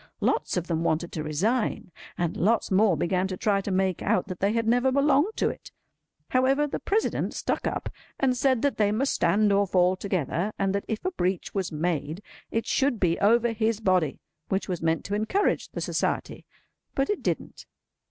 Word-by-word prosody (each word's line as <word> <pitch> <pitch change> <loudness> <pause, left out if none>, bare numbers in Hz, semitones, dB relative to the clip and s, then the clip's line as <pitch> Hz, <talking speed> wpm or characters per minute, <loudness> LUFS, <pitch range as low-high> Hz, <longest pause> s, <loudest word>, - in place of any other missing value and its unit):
Lots - - 0
of 175 - -1
them 165 -1 -1
wanted 170 +1 0
to 155 - -4
resign, 185 - -1 0.3
and 175 -2 -1
lots 220 +4 +1
more 190 -3 +4
began 185 +4 0
to 185 -1 -5
try 200 0 +1
to 200 - -5
make 190 -1 0
out 185 - +1
that 185 - -6
they 200 +1 +2
had 230 -1 0
never 245 +3 +3
belonged 285 +8 +3
to - - +2
it. - - -9 0.6
However, 265 +3 +3
the 290 - -4
President 430 +3 -1
stuck - - -1
up, - - -3 0.3
and 260 -2 +2
said 260 -1 +1
that 285 - +1
they 205 -1 +3
must 260 +6 0
stand 200 +4 +3
or 200 0 +3
fall 180 0 +3
together, 185 +1 -2
and 195 -1 0
that 200 - -2
if 220 +7 -4
a 370 - +1
breach 185 - -2
was 195 -3 -2
made 160 +2 -2 0.3
it 225 - -1
should 270 -5 +1
be 170 -3 +1
over 235 +3 +3
his 220 -1 0
body—which 185 -1 -1
was 180 -3 -3
meant 165 0 0
to 200 - -4
encourage 220 - 0
the - - -6
Society: - - -2 0.5
but 275 +5 +1
it 415 - -2
didn't. - - -4
200 Hz, 190 wpm, -26 LUFS, 180-235 Hz, 0.6 s, more